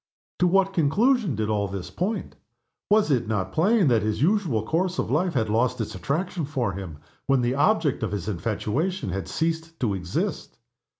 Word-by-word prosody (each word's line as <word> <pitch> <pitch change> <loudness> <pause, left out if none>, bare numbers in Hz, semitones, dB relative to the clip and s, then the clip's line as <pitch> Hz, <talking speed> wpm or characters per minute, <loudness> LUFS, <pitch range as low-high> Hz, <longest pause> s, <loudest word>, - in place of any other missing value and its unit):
To 180 - +4
what 195 +2 +3
conclusion 195 - +2
did 110 0 -1
all 105 -2 0
this 95 -1 -6
point? 195 +3 -3 0.5
Was 210 -6 +4
it 125 -5 +1
not 95 -4 -2
plain 195 +2 +3
that 115 -3 +3
his 110 0 -1
usual 165 - +2
course 175 +8 0
of - - -1
life 165 +3 +1
had 115 -3 +1
lost 115 +4 +1
its 110 - -3
attraction 155 - -2
for 135 -7 -1
him, 90 -5 -7 0.3
when 135 -2 +3
the 120 +1 +1
object 150 +1 +2
of 110 - -2
his 100 -4 -4
infatuation 110 - -2
had 95 +2 -3
ceased 165 0 -2
to 110 -5 0
exist? 90 -2 -3
140 Hz, 180 wpm, -25 LUFS, 105-180 Hz, 0.5 s, To